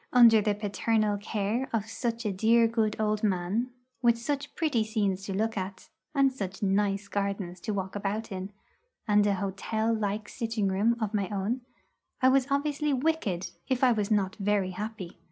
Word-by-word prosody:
Under 230 Hz, -3 st, +7 dB
the 210 Hz, 0 st, +1 dB
paternal 210 Hz, 0 st, 0 dB
care 215 Hz, +5 st, -1 dB
of 220 Hz, -3 st, 0 dB
such 230 Hz, +1 st, -3 dB
a 210 Hz, -, +1 dB
dear 230 Hz, +4 st, +4 dB
good 225 Hz, -2 st, 0 dB
old 215 Hz, -1 st, +1 dB
man, 200 Hz, +4 st, 0 dB, 0.3 s
with 235 Hz, -2 st, +4 dB
such 280 Hz, +4 st, -3 dB
pretty 295 Hz, -9 st, +1 dB
scenes 205 Hz, -4 st, -1 dB
to 195 Hz, -, -4 dB
look 220 Hz, +3 st, 0 dB
at, 190 Hz, -1 st, -5 dB, 0.3 s
and 275 Hz, -1 st, +4 dB
such 195 Hz, -3 st, -5 dB
nice 200 Hz, 0 st, +1 dB
gardens 200 Hz, -3 st, -3 dB
to 215 Hz, -, -3 dB
walk 190 Hz, -1 st, -3 dB
about 205 Hz, +2 st, -3 dB
in, 190 Hz, +1 st, -5 dB, 0.6 s
and 210 Hz, -1 st, +4 dB
an 200 Hz, -, +2 dB
hotel 205 Hz, +4 st, -1 dB
like 210 Hz, -1 st, -2 dB
sitting 225 Hz, -4 st, -1 dB
room 210 Hz, +5 st, +2 dB
of 220 Hz, -2 st, -2 dB
my 200 Hz, -3 st, 0 dB
own, 210 Hz, +5 st, -1 dB, 0.6 s
I 260 Hz, -2 st, +5 dB
was 265 Hz, 0 st, +3 dB
obviously 290 Hz, +1 st, 0 dB
wicked 260 Hz, -, 0 dB, 0.2 s
if 260 Hz, 0 st, 0 dB
I 255 Hz, -, +6 dB
was 210 Hz, -3 st, 0 dB
not 200 Hz, -3 st, +1 dB
very 200 Hz, -2 st, +1 dB
happy. 205 Hz, -2 st, -6 dB
215 Hz, 175 wpm, -28 LUFS, 195-235 Hz, 0.6 s, Under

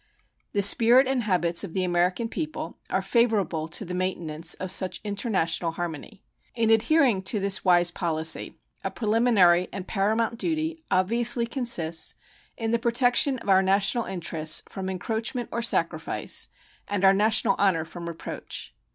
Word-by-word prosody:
The 200 Hz, -, +3 dB
spirit 235 Hz, +6 st, +5 dB
and 260 Hz, -1 st, 0 dB
habits 175 Hz, -5 st, +1 dB
of 180 Hz, -5 st, -7 dB
the 190 Hz, -, 0 dB
American 180 Hz, +5 st, 0 dB
people 310 Hz, +6 st, -6 dB
are -, -, -1 dB
favorable 200 Hz, -10 st, +1 dB
to 175 Hz, +5 st, -4 dB
the 180 Hz, -, -6 dB
maintenance 175 Hz, -3 st, -2 dB
of 185 Hz, -1 st, -4 dB
such 185 Hz, -1 st, +1 dB
international 190 Hz, -6 st, -1 dB
harmony. 175 Hz, +4 st, -7 dB, 0.3 s
In 225 Hz, -1 st, +1 dB
adhering 230 Hz, -1 st, +3 dB
to 210 Hz, +2 st, -1 dB
this 195 Hz, -1 st, +1 dB
wise 175 Hz, -1 st, +4 dB
policy, 160 Hz, -3 st, -1 dB, 0.3 s
a -, -, -2 dB
preliminary 210 Hz, -6 st, +3 dB
and 190 Hz, -1 st, -7 dB
paramount 220 Hz, +3 st, -1 dB
duty 320 Hz, 0 st, -2 dB
obviously 235 Hz, +5 st, +2 dB
consists 205 Hz, -, 0 dB, 0.4 s
in 225 Hz, -2 st, -2 dB
the 235 Hz, -, +1 dB
protection 245 Hz, +3 st, +2 dB
of 230 Hz, -, -8 dB
our 190 Hz, -1 st, +5 dB
national 195 Hz, +5 st, +1 dB
interests 165 Hz, -4 st, -1 dB
from 190 Hz, -1 st, -6 dB
encroachment 225 Hz, +6 st, -4 dB
or 235 Hz, -, -2 dB
sacrifice 235 Hz, -, -1 dB, 0.4 s
and 200 Hz, -1 st, 0 dB
our 190 Hz, -, +7 dB
national 215 Hz, +3 st, +2 dB
honor 185 Hz, -6 st, +2 dB
from 170 Hz, +1 st, -9 dB
reproach. 165 Hz, -2 st, -7 dB
195 Hz, 150 wpm, -25 LUFS, 175-235 Hz, 0.4 s, our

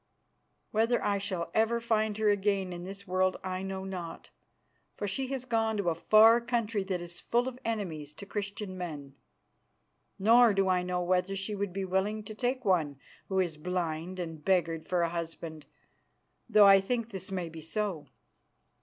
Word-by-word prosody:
Whether 225 Hz, +3 st, +2 dB
I 200 Hz, -1 st, +1 dB
shall 185 Hz, -4 st, -3 dB
ever 225 Hz, +2 st, +2 dB
find 220 Hz, -2 st, 0 dB
her 220 Hz, -1 st, +1 dB
again 195 Hz, -2 st, 0 dB
in 175 Hz, 0 st, -7 dB
this 195 Hz, +1 st, -8 dB
world 185 Hz, 0 st, +1 dB
I 185 Hz, 0 st, -3 dB
know 190 Hz, 0 st, -4 dB
not, 180 Hz, -4 st, -7 dB, 0.7 s
for 205 Hz, -, -2 dB
she 260 Hz, +7 st, -2 dB
has 260 Hz, -1 st, -4 dB
gone 225 Hz, -3 st, +1 dB
to 185 Hz, -4 st, +1 dB
a -, -, +1 dB
far 220 Hz, +7 st, +6 dB
country 230 Hz, -3 st, -1 dB
that 185 Hz, -2 st, -2 dB
is 175 Hz, 0 st, -7 dB
full 240 Hz, +2 st, +1 dB
of 255 Hz, -1 st, -6 dB
enemies 175 Hz, -10 st, -3 dB
to 200 Hz, -, -10 dB
Christian 200 Hz, -1 st, -5 dB
men. 150 Hz, -6 st, -6 dB, 1.0 s
Nor 225 Hz, +2 st, +6 dB
do 195 Hz, -1 st, +2 dB
I 185 Hz, -1 st, +3 dB
know 180 Hz, 0 st, -1 dB
whether 185 Hz, +2 st, +1 dB
she 195 Hz, +2 st, -3 dB
would 200 Hz, -1 st, -2 dB
be 195 Hz, +1 st, -3 dB
willing 195 Hz, +3 st, 0 dB
to 215 Hz, -, -8 dB
take 250 Hz, +3 st, -2 dB
one 160 Hz, -8 st, +2 dB, 0.3 s
who 190 Hz, -1 st, 0 dB
is 170 Hz, -4 st, 0 dB
blind 175 Hz, +1 st, -3 dB
and 165 Hz, -3 st, -5 dB
beggared 165 Hz, -3 st, +1 dB
for 180 Hz, -2 st, +1 dB
a 170 Hz, -, +1 dB
husband, 165 Hz, -2 st, -6 dB, 0.8 s
though 210 Hz, -2 st, +7 dB
I 195 Hz, 0 st, +8 dB
think 230 Hz, +3 st, -2 dB
this 195 Hz, -1 st, -6 dB
may 180 Hz, -3 st, -2 dB
be 165 Hz, 0 st, -9 dB
so." 180 Hz, -1 st, -3 dB
195 Hz, 180 wpm, -30 LUFS, 175-215 Hz, 1.0 s, I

